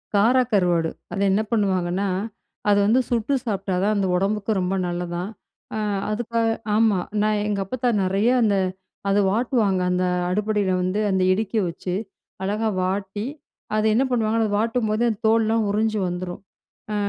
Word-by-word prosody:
கார 230 +6 +4
கருவாடு. 175 -5 +2 0.2
அத 195 - -3
என்ன 205 +3 +2
பண்ணுவாங்கன்னா, 190 -3 +1 0.6
அது 205 - +5
வந்து 235 +5 +4
சுட்டு 240 +3 0
சாப்பிட்டா 195 -4 -2
தான் 215 +1 +2
அந்த 200 -2 +1
உடம்புக்கும் 200 +2 0
ரொம்ப 185 +2 0
நல்லதாம். 175 +1 -3 0.5
அ - - -2 0.3
அதுக்காக 230 +1 0 0.3
ஆமா. 215 -4 +3 0.2
நான் 210 -1 +1
எங்க 205 -1 -1
அப்பாத்தா 250 +4 -1
நெறைய 195 +5 +2
அந்த 210 -3 +3 0.5
அதை 200 +1 +3
வாட்டுவாங்க, 215 -4 +1
அந்த 180 0 +1 0.2
அடுப்படியில 205 0 0
வந்து 185 +3 0
அந்த 190 -1 +2
இடுக்கிய 215 +1 -1
வச்சு. 180 +2 -4 0.5
அழகா 215 +3 0
வாட்டி, 195 +3 -2 0.5
அதை 215 - +1
என்ன 260 - +4
பண்ணுவாங்கன்னா, 225 -1 +1
அத 215 - 0
வாட்டும்போது 225 0 0
அந்த 220 -2 -3
தோல்ளாம் 225 -1 +2
உறிஞ்சு 215 0 +1
வந்துரும். 180 +1 -5 0.5
அ - - -1
210 Hz, 145 wpm, -23 LUFS, 190-220 Hz, 0.6 s, அது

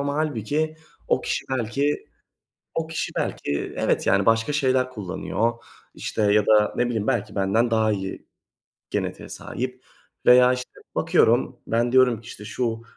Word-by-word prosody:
ama 140 0 -1
hâlbuki 155 +1 -1 0.3
o - - +3
kişi - - -2
belki 130 +4 -1 0.7
o 165 -1 -1
kişi 160 0 -3
belki 70 0 -2
evet, - - +1
yani, 100 0 +3
başka 115 +5 +2
şeyler 130 -3 +2
kullanıyor, 105 0 -2 0.4
işte, - - -4
ya 105 -1 +4
da, 105 -1 +4
ne 120 - +2
bileyim, 110 -3 -2
belki - - -1
benden 110 +5 +1
daha 110 -1 +3
iyi 95 -2 -4 0.7
genetiğe - - -3
sahip - - -6 0.4
veya, 125 0 +7
işte, 125 0 -4 0.2
bakıyorum, - - +3
ben 120 +1 +1
diyorum 130 -3 +4
ki, 115 - -17
işte, 105 - -9
"Şu 115 0 -2
120 Hz, 150 wpm, -24 LUFS, 105-130 Hz, 0.7 s, veya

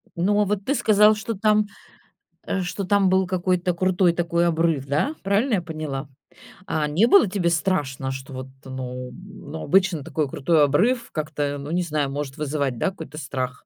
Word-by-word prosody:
Ну, 195 +4 +2
а - - +3
вот 200 0 -2
ты 280 - +1
сказал, 215 -3 +5
что 220 +1 -4
там, 210 +1 +2 0.8
э, 195 - -2
что 180 +2 -3
там 200 0 +3
был 190 0 +2
какой-то 180 -1 0
крутой 180 0 +2
такой 170 0 +1
обрыв, 165 -4 +1
да, 155 - 0
правильно 210 +5 +2
я 185 - 0
поняла? 155 -4 -5 0.6
А 155 -5 -1
не 170 +10 +3
было 395 - +6
тебе 180 -3 0
страшно, 150 -6 -1
что 130 +1 -7
вот, 130 0 -6 0.2
ну, 125 -1 -6
м, 185 +1 -12
ну, 160 - -5
обычно 180 -2 +2
такой 155 -1 -2
крутой 150 +3 +2
обрыв 230 - +1
как-то, 150 -2 -2
ну, 140 +2 -6
не 180 +1 +1
знаю, 150 -4 -1
может 140 0 -5
вызывать, 140 -4 -2
да, 190 - +1
какой-то 155 -4 -10
страх? 130 -4 -4
170 Hz, 185 wpm, -23 LUFS, 145-195 Hz, 0.8 s, было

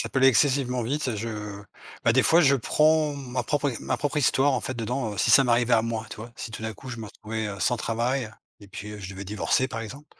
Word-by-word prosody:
ça - - -2
peut - - -1
aller 135 0 +7
excessivement 130 -1 +2
vite. 130 0 -1
Je, 115 +3 -4 0.8
bah, 115 - +5
des 130 - +4
fois, 165 - +5
je 140 -4 +5
prends 150 +3 +2
ma 130 -3 -4
propre 145 +3 0
é 115 - -5
ma 130 - -1
propre 145 +2 -2
histoire, 140 0 +3
en 125 - 0
fait, 130 - -4
dedans, 115 -2 -3
si - - +2
ça 135 - +7
m'arrivait 120 0 +3
à 110 - +3
moi, 115 -1 -3
tu - - -7
vois, 115 +2 -9
si 115 - -7
tout 110 - -7
d'un 110 0 -3
coup, 130 - -12
je 120 - -5
me 115 - -7
retrouvais, 110 +1 -5
heu, 100 -2 -6
sans 125 +6 +2
travail 115 +1 -1 0.3
et 100 - -15
puis 105 +1 -8
je 95 0 -7
devais 95 +1 -7
divorcer, 105 +6 0
par 115 -3 -5
exemple, 135 +7 -9
120 Hz, 260 wpm, -26 LUFS, 110-135 Hz, 0.8 s, aller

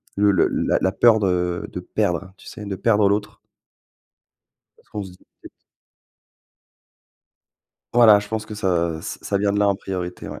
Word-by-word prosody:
Le 100 0 +3
le 95 - +3
la - - 0
la 95 - +1
peur 110 +1 +4
de 90 -3 -1
de - - -5
perdre, 95 +2 -2
tu - - -17
sais? 105 - -9
De 100 -1 -4
perdre 105 +1 +2
l'autre. 100 0 -2 1.4
Parce - - -28
qu'on 105 - -5
se 95 - -11
dit: 90 - -19 0.2
«Peut - - -12
être» - - -10 2.5
Voilà, 115 -4 +7
je 105 - -7
pense 110 0 -4
que 105 -1 -9
ça, 85 -4 -1
ça 100 +4 -4
vient 100 0 +1
de 105 - 0
là 105 - +3
en 100 - +1
priorité, 90 -2 -6
ouais. - - -8
100 Hz, 180 wpm, -22 LUFS, 90-105 Hz, 2.5 s, Voilà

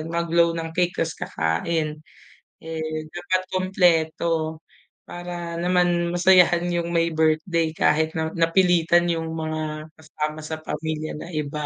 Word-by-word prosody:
at 155 - -6
mag-blow 170 0 +1
ng 165 0 -4
cake 175 +1 0
ta's 165 -1 -1
kakain. 150 - -2 0.6
Eh, 160 0 -5 0.3
dapat 180 +1 -1
kumpleto 165 -3 +1 0.5
para 175 -1 -6
naman 175 -1 +1
masayahan 175 -1 +5
yung 170 0 -1
may 165 0 +3
birthday 160 +1 +1
kahit 160 +1 +2
na 160 0 -1
napilitan 170 0 +3
yung 165 -1 -3
mga 155 -1 -4
kasama 155 0 -4
sa 160 0 -4
pamilya 155 0 -4
na - - -8
iba, 150 0 -3
165 Hz, 130 wpm, -23 LUFS, 155-175 Hz, 0.6 s, masayahan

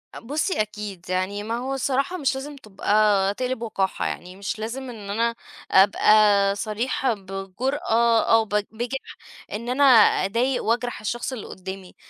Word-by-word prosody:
بُصّي 295 - -1
أكيد، 210 -4 -6
يعني 185 +3 -1
ما 225 +2 -3
هو 260 +3 -3
الصراحة 270 +6 -1
مش 275 -5 0
لازم 285 +2 -6
تبقى 205 -4 +1
تقلب 255 +2 -3
وقاحة، 200 -4 -2
يعني 180 +1 -5
مش 200 +4 -5
لازم 250 +4 -5
إن 210 -4 -9
أنا 230 +3 0 0.4
أبقى 200 0 +5
صريحة 230 +4 -1
بجرأة، 225 - 0
أو 225 -1 +5
ب - - -21 0.2
بجِح 240 +4 -5 0.4
إن 235 +3 -4
أنا 260 +3 +2 0.4
أضايق 245 +6 0
وأجرح 240 0 -1
الشخص 240 +4 -3
اللي 235 - -7
قدّامي، 190 0 -9
225 Hz, 145 wpm, -24 LUFS, 200-250 Hz, 0.4 s, أبقى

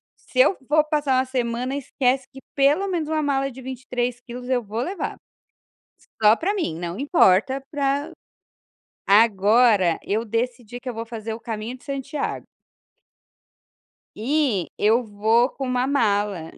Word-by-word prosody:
se - - -6
eu - - +6
for 300 +1 +4
passar 290 -4 +1
1 260 - +2
semana, 250 0 -2
esquece, 265 -1 0
que, 270 - -11 0.2
pelo 295 +8 +3
menos, 335 -5 -2
uma 315 -1 0
mala 275 -1 0
de 260 +1 -11
23 250 -1 -3
quilos 245 0 -9
eu 250 -2 0
vou 215 +3 -4
levar. 370 +6 -4 1.0
Só 215 +1 +7
para 385 - -1
mim. 325 - -2
Não 175 +2 -5
importa 265 - +3
para 285 0 -1 1.0
agora, 205 -2 +4
eu 215 +3 -1
decidi 235 +1 -3
que 255 - -13
eu - - -4
vou 225 0 -5
fazer 225 -1 -6
o 225 - -7
caminho 225 +2 -5
de - - -24
Santiago. 275 +1 -4 1.7
E 245 - 0
eu 225 +4 +3
vou 220 +4 +2
com 270 - -5
1 250 0 0
mala, 205 - 0
250 Hz, 150 wpm, -23 LUFS, 220-275 Hz, 1.7 s, Só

